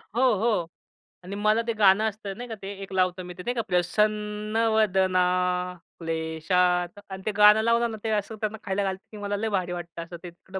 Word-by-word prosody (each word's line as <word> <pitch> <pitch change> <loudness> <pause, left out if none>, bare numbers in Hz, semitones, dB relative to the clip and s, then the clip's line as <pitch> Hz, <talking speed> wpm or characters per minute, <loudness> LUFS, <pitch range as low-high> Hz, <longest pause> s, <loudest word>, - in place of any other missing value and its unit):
हो, 245 - +2 0.2
हो 210 -6 +1 0.6
आणि 195 +2 -6
मला 215 +2 +2
ते 230 - +1
गाणं 210 0 +5
असतं 200 -2 -8
नाही 245 - -6
का 225 - -4
ते 195 - -7
एक 195 - -8
लावतो 185 0 +1
मी, 180 - -8
ते 180 +1 -10
नाही 245 - -1
का 230 - +1
प्रसन्नवदना 210 0 +1 0.8
क्लेशात. 165 +3 0
अन् 190 0 -7
ते 215 - +1
गाणं 210 +1 +7
लावलं 230 +1 +2
ना, 220 - -6
ते 220 - -1
असं 210 +1 -1
त्यांना 215 +1 -2
खायला 200 -1 -1
घालते, 190 +1 -3
की 215 - -9
मला 205 0 -2
लय 220 +1 -1
भारी 185 -3 -1
वाटतं 170 -1 -6
असं 170 +1 -9
ते. 175 - -6
तिकडं 190 +2 -9
200 Hz, 205 wpm, -26 LUFS, 180-215 Hz, 0.8 s, गाणं